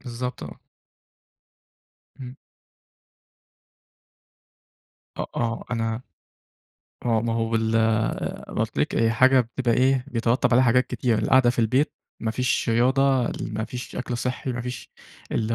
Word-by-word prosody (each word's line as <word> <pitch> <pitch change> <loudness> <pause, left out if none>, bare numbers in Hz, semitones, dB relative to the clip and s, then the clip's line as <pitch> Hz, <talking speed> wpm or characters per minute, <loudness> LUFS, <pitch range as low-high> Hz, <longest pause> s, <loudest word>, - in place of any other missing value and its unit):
بالضبط، 125 0 -5
آه. - - -9 1.6
امم. 130 0 -8 2.8
أ - - -2
آه 115 -1 -2
أنا 115 0 -1 1.0
آه 115 -2 +2
ما 115 0 -1
هو 115 0 -1
بال 110 0 0 0.8
قُلت - - -2
لِك - - 0
هي 115 0 +3
حاجة 130 +3 +5
بتبقى 120 0 -1
إيه 130 0 +2
بيترتب 120 0 +1
عليها 130 +2 +5
حاجات 125 +1 +3
كتير، 120 -4 0
القعدة 130 +1 +4
في 120 - -6
البيت 125 +6 +2 0.3
ما 110 - -1
فيش 125 +1 0
رياضة، 130 +2 +2
ما 110 0 -3
فيش 125 +1 -7
أكل 125 -1 -3
صحّي، 125 +1 -3
ما 125 - -4
فيش 125 0 -7 0.4
اللي 115 0 0
120 Hz, 125 wpm, -24 LUFS, 115-125 Hz, 2.8 s, حاجة